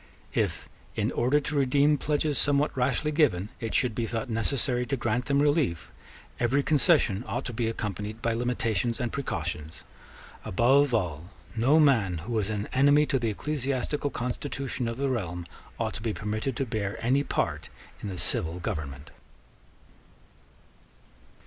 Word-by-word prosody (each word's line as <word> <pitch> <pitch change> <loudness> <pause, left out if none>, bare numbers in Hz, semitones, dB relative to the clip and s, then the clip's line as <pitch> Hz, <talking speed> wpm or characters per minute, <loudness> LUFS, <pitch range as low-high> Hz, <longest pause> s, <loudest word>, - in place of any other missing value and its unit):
If, - - -1 0.3
in - - 0
order 130 +5 +2
to 150 +1 -4
redeem 140 +2 +4
pledges 150 -1 +1
somewhat 145 +1 +2
rashly 130 +4 +1
given, 125 - +2
it 115 -2 -3
should 125 -3 +2
be 115 +1 -2
thought 115 +1 -3
necessary 125 +2 +1
to 135 - -1
grant 120 +1 0
them 140 0 +2
relief, 145 - +1 0.5
every 130 +4 +2
concession 145 - +3
ought - - -3
to 125 - -4
be 115 0 -1
accompanied 105 -1 -4
by 115 0 0
limitations 115 -2 0
and 120 -3 -1
precautions. 85 - -4 0.6
Above 135 +7 +3
all, 85 -5 -2 0.3
no 130 +8 +4
man 115 - +4
who 95 +9 -5
was 110 -2 0
an 105 -1 -2
enemy 145 +3 +5
to 140 -3 0
the 115 -2 0
ecclesiastical 140 +3 -1
constitution 125 0 -3
of 115 0 -3
the 140 +1 0
realm 90 -9 -2 0.3
ought - - -1
to - - -6
be 110 -1 -1
permitted 110 +5 -2
to 135 - -1
bear 110 -3 -3
any 135 +4 +3
part 75 - -2 0.3
in 105 - -4
the 95 - -5
civil 85 0 0
government. 70 -4 -5
120 Hz, 155 wpm, -28 LUFS, 105-140 Hz, 0.6 s, enemy